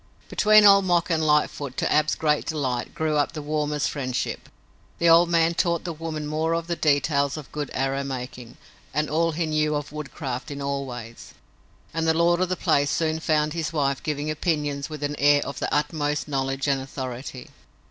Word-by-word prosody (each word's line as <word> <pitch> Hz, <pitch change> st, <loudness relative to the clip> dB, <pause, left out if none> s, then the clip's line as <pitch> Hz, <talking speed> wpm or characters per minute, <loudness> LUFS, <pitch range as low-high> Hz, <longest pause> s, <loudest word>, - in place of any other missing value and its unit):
Between 215 Hz, 0 st, +6 dB
Old 200 Hz, -1 st, +7 dB
Mok 175 Hz, -1 st, +2 dB
and 160 Hz, -1 st, +1 dB
Lightfoot, 150 Hz, -3 st, +1 dB
to -, -, 0 dB
Ab's 155 Hz, 0 st, +2 dB
great 150 Hz, -2 st, 0 dB
delight, 130 Hz, -6 st, -2 dB
grew 155 Hz, -1 st, 0 dB
up 145 Hz, +2 st, +1 dB
the 155 Hz, -, -5 dB
warmest 150 Hz, -1 st, -1 dB
friendship. 130 Hz, -3 st, -3 dB, 0.5 s
The 170 Hz, -, +2 dB
old 170 Hz, +1 st, +6 dB
man 165 Hz, 0 st, +3 dB
taught 170 Hz, -1 st, 0 dB
the 170 Hz, -, -4 dB
woman 155 Hz, -1 st, -5 dB
more 155 Hz, +2 st, -1 dB
of 165 Hz, 0 st, -2 dB
the 170 Hz, 0 st, -2 dB
details 145 Hz, -2 st, +1 dB
of 150 Hz, -, -9 dB
good 150 Hz, -2 st, -4 dB
arrow 135 Hz, +1 st, -1 dB
making 125 Hz, -3 st, -7 dB, 0.4 s
and 150 Hz, 0 st, 0 dB
all 165 Hz, +1 st, +1 dB
he 165 Hz, +1 st, -1 dB
knew 155 Hz, -1 st, +1 dB
of 145 Hz, -1 st, -4 dB
woodcraft 140 Hz, -3 st, -5 dB
in 145 Hz, -1 st, -6 dB
all 140 Hz, 0 st, -2 dB
ways, 120 Hz, -2 st, -9 dB, 0.6 s
and 165 Hz, 0 st, -1 dB
the 160 Hz, -, +3 dB
lord 170 Hz, +1 st, +3 dB
of 185 Hz, -, +1 dB
the 185 Hz, -, 0 dB
place 145 Hz, -2 st, +2 dB
soon 160 Hz, +1 st, 0 dB
found 155 Hz, -1 st, +1 dB
his 160 Hz, -2 st, -2 dB
wife 140 Hz, -4 st, 0 dB
giving 150 Hz, 0 st, -2 dB
opinions 150 Hz, -3 st, -1 dB
with 150 Hz, -2 st, -7 dB
an 145 Hz, 0 st, -1 dB
air 145 Hz, 0 st, +4 dB
of 140 Hz, -, -6 dB
the -, -, -2 dB
utmost 150 Hz, 0 st, -1 dB
knowledge 135 Hz, -1 st, -2 dB
and 135 Hz, -1 st, +1 dB
authority. 130 Hz, -1 st, -7 dB
150 Hz, 195 wpm, -24 LUFS, 140-160 Hz, 0.6 s, Old